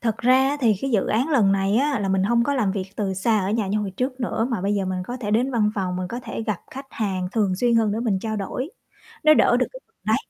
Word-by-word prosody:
Thật 225 -2 -1
ra 250 +2 +4
á, 285 - -1
thì 225 -4 +4
cái 270 - -2
dự 210 -6 +2
án 245 +7 +1
lần 230 -11 +3
này 195 +1 +1
á, 280 0 +1
là 195 - -1
mình 190 0 +2
hông 235 +4 +2
có 285 - 0
làm 215 -8 +1
việc 195 -2 -3
từ 195 -3 -1
xa 215 +4 +1
ở 190 - -1
nhà 220 -1 0
như 205 +2 0
hồi 205 -2 -3
trước 255 +6 -3
nữa, 230 -1 -1
mà 230 -6 -1
bây 200 +2 0
giờ 200 -1 0
mình 185 -1 -2
có 245 - -4
thể 205 -4 -3
đến 240 +5 +2
văn 220 -4 +2
phòng, 185 -3 -2
mình 185 0 -3
có 240 +5 -5
thể 225 -1 -5
gặp 215 -5 -2
khách 270 +1 -8
hàng 190 -4 -2
thường 205 -5 +1
xuyên 240 +3 +2
hơn 220 -2 +2
để 220 - -2
mình 220 -5 0
trao 220 +2 -3
đổi. 250 - -4 0.5
Nó 310 0 +7
đỡ 240 - +4
được 255 - +1
cái - - -10
phần - - -43
đấy. - - +3
220 Hz, 305 wpm, -23 LUFS, 195-245 Hz, 0.5 s, Nó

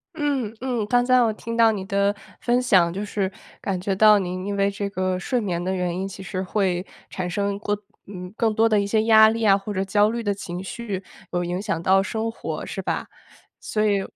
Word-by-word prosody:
嗯 275 -8 -1
嗯， 245 -4 -1
刚 245 +1 +3
才 255 0 +5
我 225 -2 +3
听 230 +2 -6
到 230 -1 +5
你 195 -3 -4
的 200 +1 +1 0.3
分 245 +1 +2
享， 185 -8 +4
就 200 +2 -3
是， 195 -2 -2 0.3
感 190 -2 -2
觉 190 +1 -1
到 210 +1 +6
您 185 0 -4
因 200 0 -2
为 200 0 +3
这 200 0 -3
个 185 -2 -1
睡 245 +7 -1
眠 175 -5 -2
的 185 +1 -1
原 180 -1 -1
因 190 - -2
其 195 0 -8
实 185 0 -4
会 185 -2 0 0.2
产 185 -2 -4
生 200 +2 -1
更 205 -1 -1 0.3
嗯， 180 -1 -8
更 225 -2 +1
多 225 +1 +4
的 215 -2 +3
一 - - -1
些 215 +2 +1
压 220 -1 +7
力 225 +1 -2
啊， 195 -1 +6
或 200 +1 -6
者 190 0 -1
焦 205 +2 +3
虑 235 +1 -2
的 205 -2 0
情 180 -2 -6
绪 195 -1 -5 0.3
有 175 0 -1
影 180 +2 -2
响 200 -6 -2
到 190 +2 +4
生 220 +2 -2
活 225 - -5
是 - - -5
吧？ - - -3 0.5
所 215 0 0
以 200 -2 +2
200 Hz, 245 characters per minute, -23 LUFS, 185-220 Hz, 0.5 s, 压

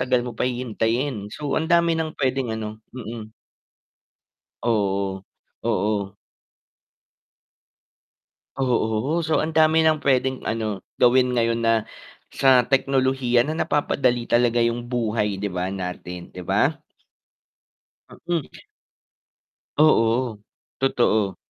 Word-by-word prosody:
tagal 125 -1 +1
mo 125 - -5
pa 125 +3 -1
hihintayin. 120 -1 -2
So 145 +5 -5
ang 160 +1 0
dami 170 -1 +4
ng 155 -1 -4
pwedeng 130 -4 -1
ano 110 0 -6 0.2
mm. 110 -2 -7 1.3
Oo, 100 -4 0 0.4
oo. 100 0 -1 2.4
Oo, 125 +5 0
so 160 0 +1
ang 160 0 -2
dami 160 0 +5
ng 155 -1 +2
pwedeng 130 -1 +1
ano, 110 -3 -3 0.2
gawin 125 +1 +4
ngayon 115 -1 0
na 115 0 +4 0.6
sa 130 -2 +4
teknolohiya 130 -2 +2
na 155 - -2
napapadali 130 -6 0
talaga 120 0 +2
yung 120 +1 0
buhay 110 -4 -1
'di 105 - -2
ba, 90 +1 -2
natin, 90 -2 -6
'di 90 - -7
ba? - - +1 1.4
Mm. 170 -4 -1 1.3
Oo, 120 -6 +3 0.4
totoo. 110 -6 +1
120 Hz, 105 wpm, -23 LUFS, 110-135 Hz, 2.4 s, dami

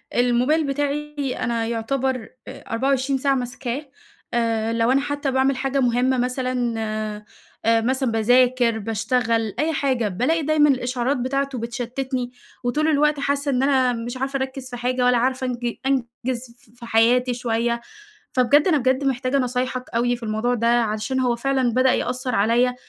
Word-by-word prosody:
الموبايل 250 +6 +2
بتاعي 290 0 -2
أنا 230 -2 -1
يعتبر 255 +1 -2 0.2
آآ - - -9
24 265 +3 +1
ساعة 275 0 +2
ماسكاه، 250 +2 -4 0.5
آآ 230 -1 0
لو 230 +1 +2
أنا 275 +1 +3
حتّى 285 -1 -2
باعمل 265 0 +2
حاجة 270 +1 -1
مهمة 250 +1 +2
مثلًا 250 -1 -1 0.9
آآ 225 0 +4
مثلًا 260 +1 0
باذاكر 245 +1 +3
باشتغل 225 0 0
أي 315 +2 +1
حاجة، 260 -6 0
بالاقي 250 - 0
دايمًا 295 0 +4
الإشعارات 255 +1 0
بتاعته 275 +1 -1
بتشتّتني، 245 +2 -3 0.3
وطول 300 +6 +1
الوقت 300 -1 +2
حاسّة 280 0 0
إن 255 +1 +1
أنا 260 -3 +3
مش 240 +2 -5
عارفة 270 +1 -2
أركّز 265 -1 -5
في 245 - -6
حاجة 250 +1 0
ولا 250 -1 +4
عارفة 260 +1 0
أنج 240 -1 -3 0.5
أنجز 240 -1 -4
ف 240 +2 -24
في 235 - -9
حياتي 240 +2 +3
شوية، 235 0 -1 0.5
فبجد 280 +5 +4
أنا 330 -5 +4
بجد 260 +1 +1
محتاجة 260 0 0
نصايحك 255 0 -2
أوي 245 +1 +2
في 240 - -11
الموضوع 220 +3 0
ده، 230 -1 0
علشان 235 +1 +1
هو 250 -2 +1
فعلًا 260 0 0
بدأ 255 +1 +4
يأثّر 255 +1 -2
عليّا، 240 +4 +2
250 Hz, 155 wpm, -22 LUFS, 235-270 Hz, 0.9 s, آآ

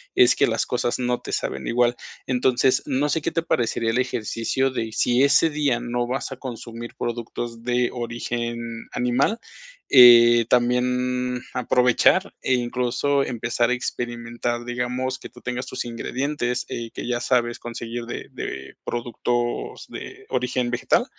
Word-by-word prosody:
es 125 0 +6
que - - +3
las 115 -1 0
cosas 120 -1 -1
no 125 -1 -1
te - - -7
saben 65 - -2
igual. 120 0 +2 0.3
Entonces, 130 0 +2
no 145 +1 +1
sé 160 +2 0
qué - - 0
te 165 - -1
parecería 115 -6 0
el 120 - 0
ejercicio 130 +1 -1
de 115 -3 -3
si 120 +3 +2
ese 150 +3 +5
día 145 -5 +1
no 120 0 -2
vas 130 +2 -3
a 135 - -6
consumir 120 -2 -7
productos 120 0 -4
de 125 0 +1
origen 120 -1 -4
animal, 125 - +1 0.5
eh, 120 -2 +8
también 125 0 +1
aprovechar 125 -1 +3
e 130 - +2
incluso 125 +3 0
empezar 120 -1 0
a - - +3
experimentar, 120 -1 -3
digamos, 125 +2 -2
que - - -8
tú - - -16
tengas 125 +1 -3
tus 130 - -4
ingredientes, 125 +1 -2
eh, 115 -1 -4
que - - -6
ya 120 -1 0
sabes 120 -1 +1
conseguir 120 0 -6
de 120 - -6
de 65 0 -6
productos 120 0 -2
de - - -9
origen 125 -1 -1
vegetal. 125 - +2
120 Hz, 150 wpm, -23 LUFS, 120-125 Hz, 0.5 s, eh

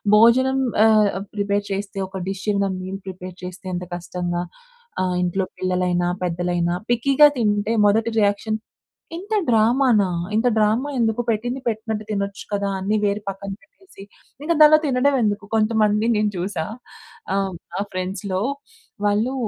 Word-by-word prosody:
భోజనం 260 +5 +5 0.3
ఆహ్, 215 -2 +5 0.3
ప్రిపేర్ 205 0 0
చేస్తే 195 0 -4
ఒక 190 -1 -6
డిష్ 195 -1 -5
ఇంద 200 0 +1
మీల్ 190 +1 -6
ప్రిపేర్ 185 -1 -7
చేస్తే 180 +1 -8
ఎంత 180 0 -3
కష్టంగా 175 0 -3 0.6
ఆహ్, 185 -1 0
ఇంట్లో 185 +2 0
పిల్లలైనా, 180 -1 0 0.2
పెద్దలైనా 175 0 0 0.2
పిక్కీగా 275 +5 +5
తింటే, 210 -1 +1
మొదటి 220 +3 +2
రియాక్షన్, 205 +2 0 0.6
ఇంత 400 +5 -4
డ్రామానా! 225 -3 +3 0.2
ఇంత 225 +3 +2
డ్రామా 220 +6 +2
ఎందుకు, 225 -1 +1
పెట్టింది 245 +4 -2
పెట్టినట్టు 220 -1 -2
తినొచ్చు 200 -1 -3
కదా! 200 -1 0
అన్నీ 200 +3 0
వేరి 205 +1 0
పక్కన 195 0 -5
పెట్టేసి, 330 - -17 0.4
ఇంక 335 - 0
దానిలో 305 0 +8
తినడం 275 +1 +2
ఎందుకు? 205 -1 0
కొంతమంది 215 0 +2
నేను 210 0 +1
చూసా. 175 -2 -2 0.7
ఆహ్, 195 -1 0 0.2
నా - - -2
ఫ్రెండ్స్‌లో 185 +1 -3 0.7
వాళ్ళు 215 +6 +1
205 Hz, 135 wpm, -22 LUFS, 190-225 Hz, 0.7 s, దానిలో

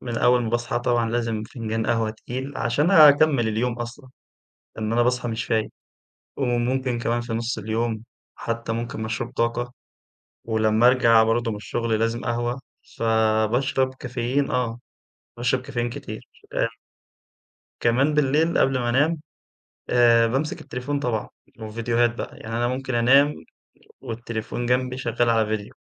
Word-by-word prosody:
من 120 -2 -4
أول 125 0 +4
ما 110 - -2
باصحى 120 0 -1
طبعًا 120 -2 0
لازم 115 -2 -1
فنجان 110 -2 -4
قهوة 115 -2 +1
تقيل، 130 +5 -6
عشان 145 +9 +1
أكمل 145 - +6
اليوم 120 +3 -1
أصلًا، 120 +3 -7 0.7
لإن 110 0 -2
أنا 120 - +3
باصحى 125 0 0
مش 115 0 -3
فايق، 110 -1 0 0.7
وممكن 125 -1 0
كمان 120 +1 0
في 120 -1 -5
نُص 115 +1 -2
اليوم 110 +1 -2 0.3
حتى 115 0 -4
ممكن 115 -1 -4
مشروب 115 +2 -3
طاقة، 120 +1 -1 0.7
ولما 110 +1 +3
أرجع 115 -3 +5
برضه 115 +1 +1
من 105 - -4
الشغل 110 +1 -2
لازم 115 +1 0
قهوة، 120 +2 -2 0.4
فباشرب 115 +4 +1
كافيين 130 +2 -2
آه، 120 -2 -1 0.6
باشرب 125 +1 +1
كافيين 120 -2 -3
كتير - - -8 0.3
أ - - +1 1.1
كمان 130 +6 +2
باللّيل 150 +3 +2
قبل 135 -1 +3
ما 120 -1 -1
أنام، 145 +6 +2 0.7
آآ 120 -1 +5
بامسك 135 +6 -2
التليفون 140 +4 -4
طبعًا 115 -6 -2 0.3
والڤيديوهات 115 +2 0
بقى. - - -6
يعني 115 +1 -5
أنا 120 0 +1
ممكن 130 0 -3
أنام 135 +5 +5 0.7
والتليفون 115 +1 -5
جنَبي 125 +1 0
شغّال 120 -1 0
على 115 -1 +3
ڤيديو، 100 - -12
120 Hz, 140 wpm, -24 LUFS, 115-125 Hz, 1.1 s, أكمل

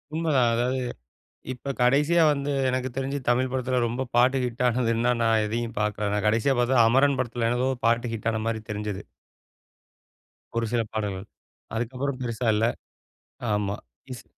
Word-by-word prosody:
உண்மதான். 145 -7 +2
அதாவது 125 +3 0 0.7
இப்ப 140 +2 -5
கடைசியா 150 +7 +4
வந்து, 140 0 -2 0.2
எனக்குத் 130 -1 -2
தெரிஞ்சு 135 +1 -2
தமிழ் 130 +2 +2
படத்துல 130 -1 0
ரொம்ப 125 +3 -3
பாட்டு 130 +3 +4
ஹிட் 125 0 -2
ஆனது 120 -1 +1
என்னான்னா, 120 +1 +1
நான் 110 -1 +3
எதயும் 115 +1 -3
பாக்கல. 105 -1 -1
நான் 105 0 -1
கடைசியா 115 +5 +2
பாத்த 120 0 +4
அமரன் 135 +3 +3
படத்துல 120 -1 -1
ஏதோ 130 - +1 0.2
பாட்டு 120 0 +1
ஹிட்டான 110 0 -2
மாரி 110 -1 -2
தெரிஞ்சது. 105 -1 -4 1.6
ஒரு 115 - +1
சில 120 - +2
பாடல்கள். 105 -2 -3 0.5
அதுக்கப்புறம் 130 +4 -3
பெருசா 115 0 -2
இல்ல. 110 +2 +2 0.9
ஆமா. 105 -1 -1 0.4
ஸ் - - -15
120 Hz, 145 wpm, -26 LUFS, 110-130 Hz, 1.6 s, கடைசியா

